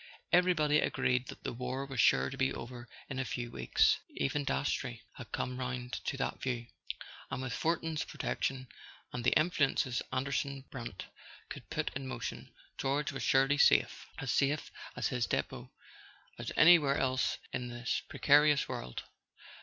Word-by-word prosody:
Everybody 165 -5 +4
agreed 125 -3 +1
that - - -10
the - - -3
war 125 +3 -3
was 135 -3 -6
sure 65 -10 +4
to - - -5
be 65 - +2
over 120 - -7 0.2
in 135 -2 -4
a - - +1
few 120 -1 -4
weeks; 60 - +3 0.2
even 105 - 0
Dastrey 125 -4 -1
had 120 -4 -9
come 125 0 -3
round 125 -1 -4
to 135 - -2
that 135 - -2
view; 120 -2 -2 0.6
and - - -3
with 130 -1 -3
Fortin's 160 0 0
protection, 130 -1 -3 0.5
and 120 - -3
the - - +4
influences 140 -6 +1
Anderson 140 +1 -2
Brant 120 -3 -6 0.5
could - - -8
put - - -1
in 135 0 -5
motion, 120 -4 -5 0.3
George 140 +2 0
was 135 - -5
surely 135 +2 +3
safe—as 135 -1 +3
safe 145 +2 +1 0.3
at - - -1
his 125 -3 0
depot - - -2 0.7
as - - -4
anywhere 155 -4 +7
else 130 0 +1 0.2
in 125 - -2
this 120 0 -2
pre¬ - - -8
carious 145 0 +5
world. 60 0 -5
130 Hz, 155 wpm, -33 LUFS, 125-140 Hz, 0.7 s, anywhere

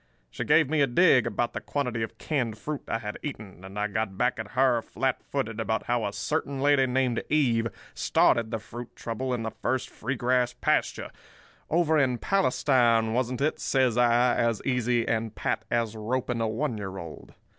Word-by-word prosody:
She - - -4
gave 160 -3 +4
me 155 +1 +1
a 140 - +4
dig 125 -3 +4
about 120 +2 -1
the - - -4
quantity 125 -5 -2
of 110 - -4
canned 125 -8 -2
fruit 145 +7 -4
I - - -1
had 105 -2 -6
eaten, 105 - -7
and 95 +2 -9
I 105 - 0
got 100 -2 -3
back 125 +1 +1
at 110 -2 -6
her, 130 -2 +3
flat 130 +3 -2
footed, 115 -5 -3
about 110 0 -1
how 120 -3 0
a - - -3
certain 140 +3 -2
lady 140 -1 +4
named 125 -1 +1
Eve 120 -7 +2 0.3
started 115 -2 +2
the 115 - -2
fruit 120 +2 -9
trouble 125 +3 -4
in 120 -2 -1
the 110 - -3
first 130 +3 -2
free 130 +5 -3
grass 125 0 +1
pasture—'Over 160 -1 -1
in 130 -3 +2
Palestine, 120 - +2
wasn't 125 +1 -1
it?' 150 +2 0
says 130 -4 +2
I, 120 0 +4
as 115 -2 +1
easy 125 -2 +1
and 110 -1 -1
pat 110 - -2
as 115 -2 0
roping 120 +2 -2
a 115 - +1
one 115 +1 -2
year 95 -1 -5
old. 85 -4 -10
120 Hz, 190 wpm, -27 LUFS, 110-130 Hz, 0.3 s, gave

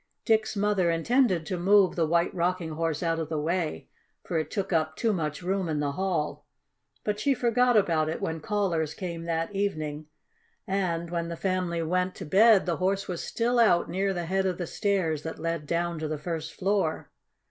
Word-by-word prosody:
Dick's 220 -1 +2
mother 200 -3 +2
intended 180 +1 +2
to 180 0 -3
move 195 +1 +4
the 165 -2 +1
White 170 +2 +2
Rocking 175 -1 -1
Horse 160 0 -2
out 165 -1 0
of 160 -2 -3
the 160 - -2
way, 160 - -2 0.4
for 165 - -1
it 155 -1 -3
took 195 -3 -2
up 155 -1 +1
too 225 -2 +1
much 155 -2 -3
room 190 -1 -1
in 150 -2 -1
the 145 -1 0
hall, 175 -2 -2 0.6
but 210 0 -1
she 280 +2 +2
forgot 245 0 +3
about 160 -6 +2
it 160 - -3
when 160 0 -3
callers 165 -5 -1
came 170 -3 -5
that 165 +3 -2
evening, 155 -7 -2 0.6
and, 175 -3 -1
when 170 -1 -2
the 170 0 -5
family 180 -3 -1
went 180 +3 0
to - - -7
bed, 205 +5 +5
the 175 -2 -1
Horse 195 +2 0
was 175 -2 -4
still 240 +1 0
out 205 -7 +4
near 195 +2 0
the 175 -2 -3
head 190 +2 0
of 185 - -1
the 175 - -3
stairs 175 -6 0
that 160 +1 -6
led 165 -2 -3
down 170 0 -1
to 155 - -2
the 155 0 -3
first 160 +1 -4
floor. 190 -4 -1
175 Hz, 200 wpm, -27 LUFS, 160-195 Hz, 0.6 s, bed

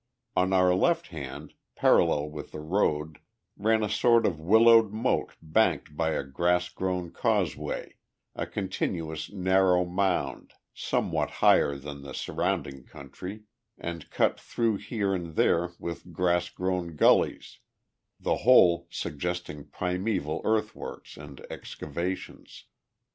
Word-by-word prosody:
On 90 +1 +2
our 90 -1 +4
left 170 - +1
hand, 70 -6 -8 0.2
parallel 75 +1 +3
with 75 -1 -8
the - - -6
road, 75 -2 -1 0.4
ran 110 +2 +2
a - - +1
sort 115 +3 +3
of 85 -4 0
willowed 110 +5 +6
moat 110 +4 -1
banked 80 -3 +1
by 80 0 0
a - - -1
grass 90 +6 0
grown 90 -2 -3
causeway, - - -2 0.4
a - - -3
continuous 85 -5 -3
narrow 95 -2 +3
mound, 90 +1 -1 0.2
somewhat - - -1
higher 70 - +3
than 70 0 -8
the 70 0 -8
surrounding 70 -2 -2
country, 90 +12 -9 0.3
and 85 -2 -6
cut - - +1
through 115 -3 -1
here 100 -2 -2
and 85 -4 -4
there 85 +1 +2
with 85 +1 -7
grass 90 +1 +1
grown 90 -3 -3
gullies, - - +2 0.6
the - - 0
whole 85 -8 +5
suggesting 85 -1 -4
primeval 90 -3 -2
earthworks 110 0 -3
and 75 -1 -11
excavations. 85 +5 -6
90 Hz, 120 wpm, -28 LUFS, 80-95 Hz, 0.6 s, willowed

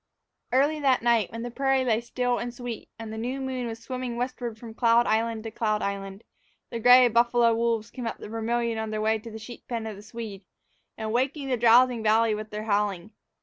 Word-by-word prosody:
EARLY 285 +5 +2
that 265 -5 +2
night, 235 -5 +2
when 230 0 -6
the 240 - -5
prairie 270 0 +1
lay 230 -2 +2
still 245 +1 -1
and 240 0 -4
sweet, 240 -2 -7
and 225 -1 -7
the 220 - -5
new 250 +4 -3
moon 260 -2 -3
was 225 -1 -5
swimming 250 +1 -5
westward 245 -2 -3
from 225 0 -10
cloud 235 0 +4
island 225 0 0
to 225 - -6
cloud 215 -1 -1
island, 195 0 -4 0.5
the 235 - -3
gray 245 +2 +8
buffalo 235 0 +3
wolves 230 -1 0
came 250 -3 -5
up - - -4
the - - -9
Vermillion 225 +1 -1
on 220 0 -3
their 215 0 -3
way 220 +1 +1
to 230 - -10
the 220 - -8
sheep 225 +2 -11
pen 230 -2 -3
of 220 -2 -5
the 200 - -11
Swede, 210 -2 -8 0.5
and 220 -1 -3
waked 260 +4 +1
the 270 -4 -2
drowsing 240 +1 +5
valley 220 +1 +3
with 215 0 -5
their 210 0 -5
howling. 205 -2 -1
230 Hz, 220 wpm, -26 LUFS, 220-245 Hz, 0.5 s, gray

